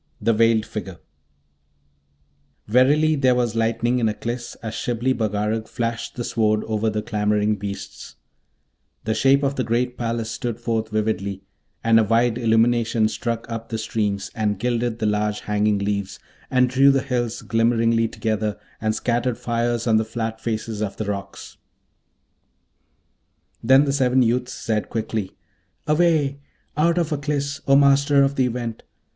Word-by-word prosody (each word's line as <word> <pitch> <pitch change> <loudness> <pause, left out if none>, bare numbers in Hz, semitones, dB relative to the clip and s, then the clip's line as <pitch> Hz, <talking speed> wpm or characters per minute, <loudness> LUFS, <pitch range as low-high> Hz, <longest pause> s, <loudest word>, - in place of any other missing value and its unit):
THE 115 - +2
VEILED 115 0 +3
FIGURE 95 -4 -6 1.7
Verily 145 +7 +4
there 130 -3 +3
was 120 -2 0
lightning 115 +2 +1
in 115 -2 +2
Aklis 120 +3 -5
as 110 -1 -4
Shibli 120 +3 -1
Bagarag 110 -1 -1
flashed 115 -1 -3
the 120 - -3
Sword 110 -2 +1
over 110 0 -1
the 105 0 -3
clamouring 105 -1 +1
beasts: 100 0 -7 0.9
the 110 - 0
shape 135 +5 +3
of 140 0 0
the 130 - +1
great 125 +2 -1
palace 115 -1 -2
stood 120 0 -4
forth 115 -2 -2
vividly, 105 -3 -2 0.4
and 115 0 +5
a - - +4
wide 115 +2 +2
illumination 115 -1 +2
struck 115 0 -3
up 115 -1 -6
the 115 - -2
streams, 105 -3 -2
and 105 -2 -1
gilded 120 +1 -1
the 110 - -2
large 105 0 0
hanging 105 0 +1
leaves, 100 -1 -2 0.3
and 125 -1 +3
drew 135 +2 +4
the 135 -1 +2
hills 120 -4 -2
glimmeringly 115 0 +2
together, 110 -1 -2 0.2
and 110 0 0
scattered 120 +1 -1
fires 120 0 -1
on 110 -2 +3
the 110 - +2
flat 110 0 -4
faces 110 -1 -3
of 105 -2 -3
the 110 - -3
rocks. 100 -1 -6 2.0
Then 135 +4 +5
the 140 - 0
seven 130 -2 +3
youths 125 +2 0
said 110 -2 -2
quickly, 110 -3 -3 0.5
'Away! 150 -3 +2 0.4
out 165 +3 +2
of 165 -2 0
Aklis, 140 -1 -2
O 135 - +5
Master 140 0 +5
of 135 0 +1
the 130 -2 +1
Event! 120 -2 -4
115 Hz, 150 wpm, -22 LUFS, 110-125 Hz, 2.0 s, and